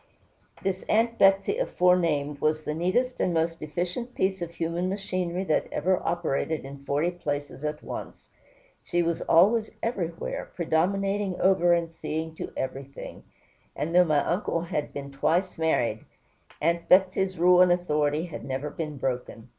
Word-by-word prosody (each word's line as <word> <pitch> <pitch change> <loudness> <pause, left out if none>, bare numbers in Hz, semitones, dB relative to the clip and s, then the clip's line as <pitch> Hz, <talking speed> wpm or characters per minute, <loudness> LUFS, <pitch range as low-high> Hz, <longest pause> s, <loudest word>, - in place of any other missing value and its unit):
This 190 -1 -1
Aunt 230 +1 +2
Betsey 195 - +4
aforenamed 165 - +2
was 155 0 +1
the 150 - -2
neatest 195 +11 0
and 175 - +1
most 165 +1 0
efficient 180 +10 -4
piece 190 -1 0
of 170 - -3
human 170 +2 -2
machinery 185 -2 -2
that 160 -5 +1
ever 185 0 +1
operated 160 -3 -1
in 140 0 -10
forty 145 +5 +1
places 145 -4 -4
at 150 0 -3
once. - - -7 0.6
She 175 -1 0
was 170 0 -1
always 215 +7 +4
everywhere, 175 -8 -3
predominating 195 +3 0
over 180 -2 +4
and 170 -1 0
seeing 160 0 -4
to - - -5
everything; 135 +1 -6 0.5
and 150 +4 -3
though 180 +1 +7
my 155 -4 +2
uncle 175 -2 0
had 160 -3 -3
been 140 0 -7
twice 170 +6 0
married, 120 -9 +1 0.6
Aunt 170 +2 0
Betsey's 190 0 +4
rule 180 +1 +6
and 180 -1 +6
authority 150 -3 +1
had 165 -8 -8
never 135 +3 -3
been 150 -3 -5
broken. 125 -2 -4
170 Hz, 150 wpm, -27 LUFS, 150-185 Hz, 0.6 s, though